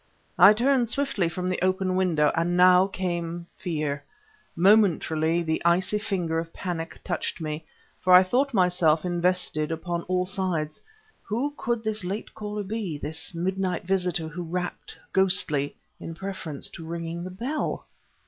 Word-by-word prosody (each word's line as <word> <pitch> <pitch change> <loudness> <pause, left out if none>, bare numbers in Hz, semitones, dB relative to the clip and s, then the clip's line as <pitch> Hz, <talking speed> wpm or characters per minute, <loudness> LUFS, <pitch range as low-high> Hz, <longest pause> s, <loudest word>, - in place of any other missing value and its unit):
I 195 +4 +9
turned 245 +1 +2
swiftly 240 -10 0
from 180 +2 -4
the 185 0 -1
open 185 0 +1
window; 165 -6 +2
and 175 +2 +1
now, 180 +1 +6
came 175 -3 -3
fear. 150 -5 -3 0.5
Momentarily, 170 -4 +3
the 160 -1 -1
icy 180 +4 +2
finger 180 -6 -1
of 165 0 -6
panic 165 -3 -5
touched 175 -1 -3
me, 155 0 -4 0.3
for 185 - +1
I 180 +1 +9
thought 260 +9 +1
myself 180 - +3
invested 175 -3 0
upon 170 +1 -3
all 180 0 +1
sides. 180 -5 -2 0.4
Who 255 +7 -2
could 235 -4 -2
this 220 -2 -2
late 195 +4 -5
caller 210 -1 -5
be, 200 -6 -4
this 155 +3 -5
midnight 185 +1 -1
visitor 180 -3 0
who 165 +3 -6
rapped, 180 +1 -5 0.2
ghostly, 180 -7 +3 0.2
in 165 - -7
preference 185 -5 -5
to 165 - -9
ringing 170 +1 -5
the 185 - -5
bell? 240 +11 -3
180 Hz, 150 wpm, -26 LUFS, 165-195 Hz, 0.5 s, I